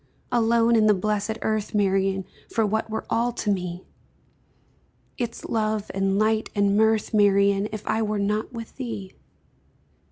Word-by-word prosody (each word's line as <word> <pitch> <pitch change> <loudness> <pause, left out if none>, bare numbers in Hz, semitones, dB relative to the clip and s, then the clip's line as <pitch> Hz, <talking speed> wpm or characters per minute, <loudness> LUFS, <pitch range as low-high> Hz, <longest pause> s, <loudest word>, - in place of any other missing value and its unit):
Alone 235 -1 +3
in 215 -1 +4
the 210 - +5
blessed 210 +2 -1
Earth, 215 -1 -1
Marian, 195 -1 +1 0.2
For 225 -1 +1
what 220 +2 -1
were 220 - -4
all 240 +1 +1
to 210 -2 -1
me 180 -2 -3 1.3
Its 235 -2 -4
love, 215 -2 -1
and 195 0 +1
light, 215 +1 +1
and 200 -1 +2
mirth, 220 0 +2
Marian, 200 -1 +3
If 215 -1 -6
I 220 +1 0
were 215 -1 -1
not 210 +2 -1
with 230 -2 -9
thee? 225 -7 -6
215 Hz, 150 wpm, -24 LUFS, 200-220 Hz, 1.3 s, the